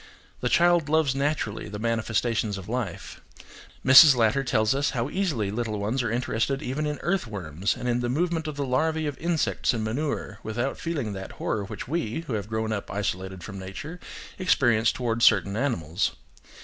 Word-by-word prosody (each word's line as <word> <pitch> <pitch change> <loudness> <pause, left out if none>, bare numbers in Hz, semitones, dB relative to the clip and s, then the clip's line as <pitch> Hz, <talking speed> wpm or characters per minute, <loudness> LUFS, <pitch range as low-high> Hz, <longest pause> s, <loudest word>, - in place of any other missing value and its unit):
The 125 - -1
child 170 -1 +4
loves 155 -3 +3
naturally 140 -7 -2
the 105 - -6
manifestations 110 -1 0
of 95 - -9
life: 115 -6 -4 0.6
Mrs. 135 +2 +10
Latter 120 +3 +2
tells 110 -3 +2
us 140 +1 +1
how 120 +4 -1
easily 150 - -1
little 110 -1 -2
ones 110 +6 0
are 120 - -1
interested 120 +3 -1
even 150 +4 -2
in 150 -1 -2
earthworms 100 - -1
and 125 - -4
in 120 0 +1
the 120 0 -1
movement 165 +3 0
of 155 - -4
the 140 -1 -2
larvae 155 +5 0
of 145 -2 -2
insects 160 -5 0
in 110 - -2
manure, 110 -3 -3
without 120 +5 -3
feeling 145 -11 -3
that 95 0 -7
horror 105 -2 -2
which - - -7
we, 160 -3 -2
who 150 -7 -6
have 105 -1 -3
grown 110 0 -1
up 100 - -4
isolated 95 -2 -3
from 100 +2 -7
nature, 125 - -7 0.4
experience 120 -11 +3
towards 115 -2 -2
certain 100 -2 +4
animals. 105 - -1
120 Hz, 175 wpm, -26 LUFS, 105-145 Hz, 0.6 s, Mrs